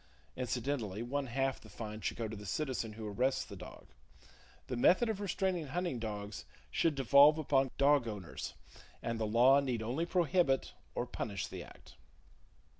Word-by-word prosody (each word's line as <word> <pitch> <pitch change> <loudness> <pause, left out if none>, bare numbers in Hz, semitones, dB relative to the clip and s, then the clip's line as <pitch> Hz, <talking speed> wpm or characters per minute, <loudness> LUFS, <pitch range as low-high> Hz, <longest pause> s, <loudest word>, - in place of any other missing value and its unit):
Incidentally, 120 -4 -2
one 135 +3 -2
half 135 +2 -1
the 110 - -14
fine 105 +1 -7
should - - -2
go 115 -1 -2
to 110 - -6
the 105 - -9
citizen 125 -2 -2
who 110 0 -6
arrests 130 +6 0
the 100 - -9
dog. 90 -1 -11 0.8
The 125 - -4
method 185 - +4
of 210 -2 -2
restraining 185 -4 -1
hunting 170 -3 -2
dogs 105 -2 -5 0.3
should 160 - +2
devolve 140 +3 +7
upon 135 -3 +2
dog 140 -3 +4
owners; 100 -7 -6 0.5
and 115 -1 -2
the 110 - 0
law 125 +6 +6
need 125 -5 -1
only 135 +10 -1
prohibit 175 -5 +2 0.2
or 120 - -1
punish 100 -5 -4
the - - -7
act. - - -16
130 Hz, 165 wpm, -34 LUFS, 110-145 Hz, 0.8 s, devolve